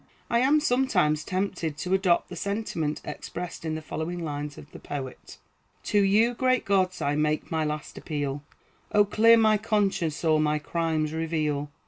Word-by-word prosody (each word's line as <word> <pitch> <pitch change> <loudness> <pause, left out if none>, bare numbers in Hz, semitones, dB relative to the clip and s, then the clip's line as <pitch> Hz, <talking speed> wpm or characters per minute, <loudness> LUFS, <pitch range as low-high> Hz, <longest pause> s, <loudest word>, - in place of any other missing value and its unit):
I 235 - +4
am 280 +5 +4
sometimes 245 - +2
tempted 185 -5 -2
to 180 +5 -2
adopt 190 -3 +2
the 180 - -7
sentiment 175 -6 -2
expressed 170 +4 -6
in 160 -1 -2
the 155 - -6
following 165 +3 -4
lines 145 -1 -5
of 145 - -12
the - - -10
poet: 135 -3 -7 0.5
"To 205 - +2
you, 215 +5 +4
great 255 +1 +1
gods, 185 -2 +1
I 140 - +1
make 150 0 0
my 160 -1 0
last 150 -1 -4
appeal; 145 -2 -3 0.5
O, 205 -1 +5
clear 225 +3 +5
my 215 -1 +4
conscience, 195 -8 0
or 155 -1 +4
my 150 0 +2
crimes 155 0 -1
reveal! 155 -3 -1
165 Hz, 165 wpm, -26 LUFS, 150-205 Hz, 0.5 s, O